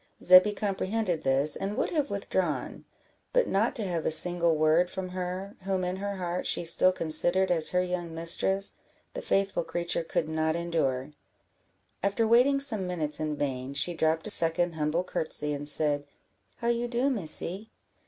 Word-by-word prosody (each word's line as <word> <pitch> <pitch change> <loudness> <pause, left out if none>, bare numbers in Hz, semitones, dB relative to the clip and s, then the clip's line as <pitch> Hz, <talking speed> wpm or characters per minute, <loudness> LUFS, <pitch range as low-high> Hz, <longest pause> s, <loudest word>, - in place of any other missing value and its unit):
Zebby 185 +3 +6
comprehended 200 -3 -3
this, 135 +3 +7
and 200 +2 -5
would - - -2
have 300 -4 -1
withdrawn; 190 -5 -4 0.5
but - - +2
not 210 +5 0
to 225 - -3
have 175 -5 -3
a - - 0
single 170 +1 +3
word 155 +3 +2
from 190 0 -6
her, 185 +2 -6
whom 190 -1 -3
in 180 +1 -3
her 200 +1 -5
heart, 180 -1 -4
she - - 0
still 170 +2 +5
considered 175 +2 0
as 160 -3 +3
her 180 0 0
young 175 -2 -5
mistress, 190 +4 0 0.4
the - - -6
faithful 195 - -1
creature 170 +1 -3
could 160 -1 -3
not 160 0 -2
endure; 150 -6 -2 0.9
after 200 +4 0
waiting 250 +5 +3
some 220 -9 +2
minutes 155 -4 -1
in 155 -1 -3
vain, 135 -1 -5
she 150 +5 +1
dropped 160 0 -1
a 215 - +5
second 170 -1 +3
humble 155 +2 -2
courtesy, 155 -4 -3
and 145 +1 0
said 145 -1 +2 0.5
"How 235 - -3
you 235 0 -1
do, 240 +2 -1
Missy? 195 0 -1
175 Hz, 170 wpm, -27 LUFS, 160-195 Hz, 0.9 s, this